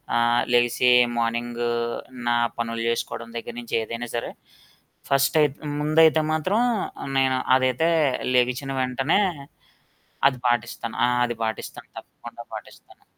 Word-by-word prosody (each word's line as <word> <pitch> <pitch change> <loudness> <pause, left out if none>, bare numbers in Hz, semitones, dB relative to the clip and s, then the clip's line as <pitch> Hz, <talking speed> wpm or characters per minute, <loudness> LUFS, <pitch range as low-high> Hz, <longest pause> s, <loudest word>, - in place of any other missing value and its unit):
ఆహ్, 120 0 +3
లెగిసి 120 +1 +3 0.3
మార్నింగు 120 +1 -1 0.6
నా 120 - +3 0.2
పనులు 115 -1 -3
చేసుకోవడం 115 0 -3
దగ్గర 115 - -7
నుంచి 120 - -4
ఏదైనా 115 +2 -6
సరే 115 - -3 0.8
ఫస్ట్ 140 +3 +2
అయితే, 145 -1 +1 0.2
ముందైతే 155 +1 +4
మాత్రం 185 +7 0 0.6
నేను 130 -1 +2 0.2
అదైతే 130 +5 +2 0.5
లెగిచిన 125 +2 +1
వెంటనే 130 +7 +1 1.1
అది 130 -2 -9
పాటిస్తాను, 115 -1 -2 0.3
అది 120 -1 -4
పాటిస్తాను. 110 - -6
తప్పకుండా - - -12
పాటిస్తాను. - - -13
120 Hz, 110 wpm, -24 LUFS, 120-135 Hz, 1.1 s, ముందైతే